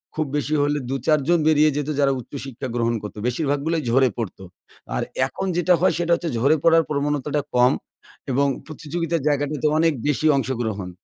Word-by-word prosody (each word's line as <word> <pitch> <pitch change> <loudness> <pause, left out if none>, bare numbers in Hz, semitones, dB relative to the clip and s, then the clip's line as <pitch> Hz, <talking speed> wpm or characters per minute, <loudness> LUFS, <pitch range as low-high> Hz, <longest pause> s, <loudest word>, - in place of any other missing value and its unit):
খুব 155 -1 0
বেশি 150 +1 -2
হলে 145 0 +1
২ 135 - -1
৪ 155 -1 +4
জন 175 -1 +4
বেরিয়ে 155 0 +5
যেত 150 +1 -2
যারা 140 -1 +4
উচ্চশিক্ষা 135 0 -7
গ্রহণ 115 0 +1
করত। 105 - -8
বেশিরভাগগুলো 145 +4 0
ঝরে 130 +1 +4
পড়তো। 105 -4 -5 0.5
আর - - 0 0.3
এখন 195 - -5
যেটা 180 +1 +3
হয়, 185 - +4
সেটা 170 0 -1
হচ্ছে 170 -1 -4
ঝরে 140 +6 +4
পড়ার 165 0 +5
প্রবণতাটা 145 0 -1 0.2
কম 125 +1 +5 0.6
এবং 140 +2 +2 0.2
প্রতিযোগিতার 160 0 -3
জায়গাটাতে 145 +1 0
অনেক 165 -1 +3
বেশি 150 +2 +1
অংশগ্রহণ। 110 -7 -2
145 Hz, 170 wpm, -22 LUFS, 130-160 Hz, 0.6 s, বেরিয়ে